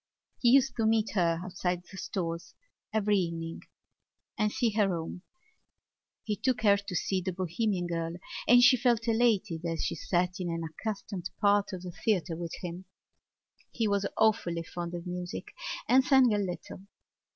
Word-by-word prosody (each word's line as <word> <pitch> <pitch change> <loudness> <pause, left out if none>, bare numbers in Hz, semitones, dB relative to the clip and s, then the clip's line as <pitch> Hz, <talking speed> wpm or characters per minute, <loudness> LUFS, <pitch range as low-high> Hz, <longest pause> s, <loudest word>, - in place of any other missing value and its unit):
He 240 - +4
used 270 0 +5
to 225 -1 +2
meet 220 -1 +2
her 170 -4 +2
outside 180 -1 -2
the 185 - -14
Stores 170 -3 -4 0.4
every 210 -1 +2
evening 165 -2 -4 0.7
and 210 -2 +1
see 230 0 +1
her 210 -1 +2
home. 170 0 -4 1.0
He 210 - -1
took 250 -1 0
her 200 -2 +6
to 200 -2 -6
see 185 +2 0
The 185 +1 -2
Bohemian 185 +1 -1
Girl 165 -1 -2 0.3
and 245 +1 +7
she 255 0 +7
felt 240 -2 +2
elated 220 -7 +2
as 165 -1 -2
she - - -1
sat 180 0 -1
in 180 -2 -2
an 165 0 -2
unaccustomed 190 +2 -5
part 205 0 +3
of 185 -1 -6
the 180 - -6
theatre 175 -1 0
with 170 0 -5
him. 180 +1 -6 0.8
He 225 -2 -1
was 200 -1 +1
awfully 175 -6 +2
fond 175 +1 -5
of 170 0 -6
music 180 0 -5 0.4
and 260 +2 +5
sang 260 -4 +5
a 205 - +1
little. 185 -1 -5
190 Hz, 165 wpm, -30 LUFS, 175-220 Hz, 1.0 s, and